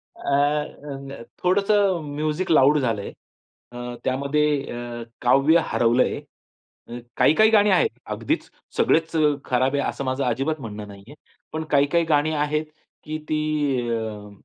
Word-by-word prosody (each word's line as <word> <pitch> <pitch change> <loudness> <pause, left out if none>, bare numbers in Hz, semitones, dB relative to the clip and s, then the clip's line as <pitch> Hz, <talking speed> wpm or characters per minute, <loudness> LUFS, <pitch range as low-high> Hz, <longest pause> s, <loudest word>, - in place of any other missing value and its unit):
अ, - - -16
अ, 140 -1 -1
अ, - - -9 0.2
थोडंसं 195 -1 +2
music 155 +5 -1
loud 150 -1 +5
झालं 115 -6 -1
आहे. - - -7 0.6
अ, 120 0 -6
त्यामध्ये 140 +3 +1 0.3
अ, 120 0 -6 0.2
काव्य 150 +5 +4
हरवलं 120 +1 +3
आहे. - - -3 0.7
अ, 120 +1 -7 0.2
काही-काही 215 +8 +5
गाणी 210 -2 +4
आहेत. 460 - +4 0.2
अगदीच - - -3 0.3
सगळेच 165 0 +2
अ, 160 - +2 0.3
खराब 130 +1 +1
आहे 140 - +1
असं 140 - -5
माझं 130 +1 -1
अजिबात 135 +5 -1
म्हणणं 105 -2 -7
नाही 100 -1 -12
आहे. 145 - -12 0.4
पण 160 0 -2
काही-काही 145 +4 +3
गाणी 150 +1 +3
आहेत 150 +1 0 0.4
की 155 0 -4
ती 155 - +1 0.5
अ, 110 -2 -4
140 Hz, 150 wpm, -23 LUFS, 120-155 Hz, 0.7 s, loud